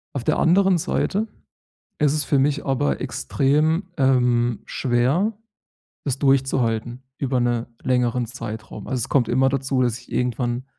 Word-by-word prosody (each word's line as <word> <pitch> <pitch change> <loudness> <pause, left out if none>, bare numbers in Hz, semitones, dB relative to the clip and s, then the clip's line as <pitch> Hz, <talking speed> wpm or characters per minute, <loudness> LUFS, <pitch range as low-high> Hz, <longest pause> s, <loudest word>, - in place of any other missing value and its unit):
Auf 120 - -3
der - - +1
anderen 190 +2 +4
Seite 210 +7 -1 0.7
ist 150 -1 +2
es 150 - 0
für 140 - +1
mich 145 +2 +1
aber 75 - 0
extrem, 150 - +1
ähm, 125 -3 +2
schwer, 135 - +1 0.7
das 135 -2 -2
durchzuhalten 130 -3 +1
über 130 -2 0
'ne 120 -1 0
längeren 125 -1 +1
Zeitraum. 110 -2 -8
Also, 130 -2 -2
es 125 - -4
kommt 125 -5 +2
immer 130 +2 +3
dazu, 135 -1 0
dass 120 -2 +1
ich 125 - -17
irgendwann 125 +1 -1
130 Hz, 145 wpm, -22 LUFS, 120-140 Hz, 0.7 s, anderen